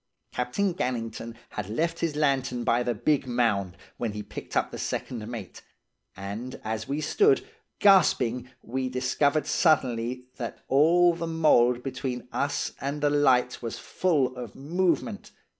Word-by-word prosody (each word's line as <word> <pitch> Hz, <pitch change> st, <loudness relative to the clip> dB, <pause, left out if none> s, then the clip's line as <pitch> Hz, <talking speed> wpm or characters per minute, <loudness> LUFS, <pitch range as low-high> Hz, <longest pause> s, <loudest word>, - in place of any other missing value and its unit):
Captain 170 Hz, +11 st, 0 dB
Gannington 115 Hz, -6 st, -3 dB
had 105 Hz, -2 st, -5 dB
left 165 Hz, +9 st, -1 dB
his 165 Hz, -3 st, -1 dB
lantern 135 Hz, -5 st, +1 dB
by 120 Hz, +1 st, +2 dB
the 120 Hz, -1 st, -1 dB
big 140 Hz, +4 st, +1 dB
mound 105 Hz, -7 st, 0 dB, 0.2 s
when 115 Hz, -3 st, -2 dB
he 105 Hz, 0 st, -5 dB
picked -, -, -6 dB
up -, -, +1 dB
the -, -, -7 dB
second 110 Hz, -4 st, -4 dB
mate; 115 Hz, -6 st, -7 dB, 0.6 s
and 105 Hz, +6 st, -6 dB
as 110 Hz, +2 st, -3 dB
we 140 Hz, +2 st, -2 dB
stood, 405 Hz, -, +3 dB, 0.3 s
gasping 125 Hz, -, +4 dB
we 130 Hz, +2 st, -2 dB
discovered 140 Hz, +4 st, +1 dB
suddenly 125 Hz, -6 st, +1 dB
that 120 Hz, -2 st, -6 dB
all 170 Hz, +5 st, +5 dB
the 165 Hz, 0 st, -4 dB
mould 125 Hz, -7 st, +3 dB
between 125 Hz, -2 st, -4 dB
us 140 Hz, 0 st, -1 dB
and 140 Hz, +2 st, -3 dB
the 145 Hz, 0 st, +3 dB
light 130 Hz, -4 st, +3 dB
was 115 Hz, -2 st, -4 dB
full 145 Hz, -9 st, 0 dB
of 120 Hz, -4 st, -8 dB
movement. 180 Hz, -, -1 dB
130 Hz, 145 wpm, -27 LUFS, 120-155 Hz, 0.6 s, all